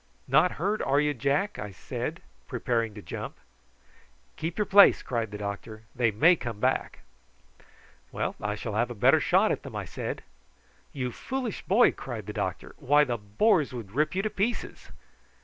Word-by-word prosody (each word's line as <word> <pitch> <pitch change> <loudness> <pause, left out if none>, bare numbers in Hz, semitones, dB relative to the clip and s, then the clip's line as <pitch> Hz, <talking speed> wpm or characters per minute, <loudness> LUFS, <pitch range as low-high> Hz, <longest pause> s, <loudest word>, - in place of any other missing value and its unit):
"Not 155 +7 +4
hurt, 200 +6 -1
are 140 +1 +2
you, 150 0 +2
Jack?" 140 - 0
I 105 - -5
said, 90 - -5 0.2
preparing 115 -3 -1
to 105 - -9
jump. - - -6 1.0
"Keep 165 +2 -4
your 210 - +1
place," 200 +1 +7
cried 115 -3 -2
the 105 - -7
doctor; 105 +2 -6
"they 120 -2 +3
may 160 - +5
come 115 -9 -6
back." 130 +3 0 1.1
"Well, - - -2
I 105 0 -1
shall 110 0 -5
have 120 +4 +1
a 120 - -6
better 100 - +5
shot - - +3
at - - -1
them," - - -9
I - - -3
said. - - -5 0.7
"You 125 -2 -3
foolish 255 - -4
boy!" 220 +6 +5
cried 115 -6 -7
the 105 - -6
doctor. 100 -4 -4
"Why, 145 +1 +4
the 120 -5 -2
boars 145 - +2
would 115 -6 -7
rip 150 - 0
you 195 - 0
to 215 - 0
pieces." 225 +5 -3
130 Hz, 175 wpm, -28 LUFS, 110-170 Hz, 1.1 s, place